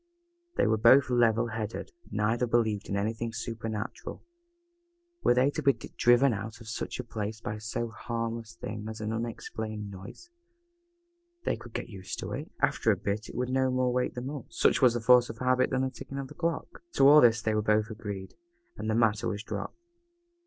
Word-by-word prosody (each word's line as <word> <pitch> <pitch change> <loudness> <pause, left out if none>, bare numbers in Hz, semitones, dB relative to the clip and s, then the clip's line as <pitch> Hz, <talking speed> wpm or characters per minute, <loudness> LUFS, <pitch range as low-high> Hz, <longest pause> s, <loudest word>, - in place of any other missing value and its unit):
They - - +3
were 110 -1 +3
both 130 +4 +6
level 120 -1 +3
headed, 110 0 -4 0.2
neither 115 +3 +1
believed 110 -3 +1
in 100 - 0
anything 110 +3 -2
super 115 0 -4
natural. 110 -1 -5 1.0
Were 120 - +4
they 130 +3 +4
to - - -3
be 140 0 +5
driven 120 +1 +3
out 110 +2 -5
of 115 - -12
such 115 - -4
a - - -2
place 110 -2 -4
by 105 -1 -5
so 115 +2 -3
harmless 115 0 -4
a - - -9
thing 105 0 -5
as 110 - -7
an 110 +1 -2
unexplained 110 -2 -4
noise? 100 - -11 1.1
They - - 0
could 120 - -12
get - - -4
used 95 -4 -7
to - - -5
it. - - -5
After - - +2
a - - +1
bit 105 +2 -3
it - - -10
would 125 +1 -1
no 130 0 +2
more 130 -1 +1
wake 125 0 0
them 125 +3 -4
up, 145 -3 -6
such - - +2
was 125 -2 +5
the 120 - -1
force 125 +1 +6
of 115 - -7
habit 130 +1 +2
than 130 0 0
the 130 - -1
ticking 135 +2 -8
of 135 -1 -4
the - - -10
clock. 170 -1 -3
To 135 - +6
all 150 +1 +9
this 115 -2 +5
they 110 - +1
both 110 0 +2
agreed, 100 -3 -6 0.4
and 110 - -3
the 110 - +1
matter 110 -2 +2
was 105 +1 -3
dropped. - - -5
115 Hz, 200 wpm, -29 LUFS, 110-125 Hz, 1.1 s, all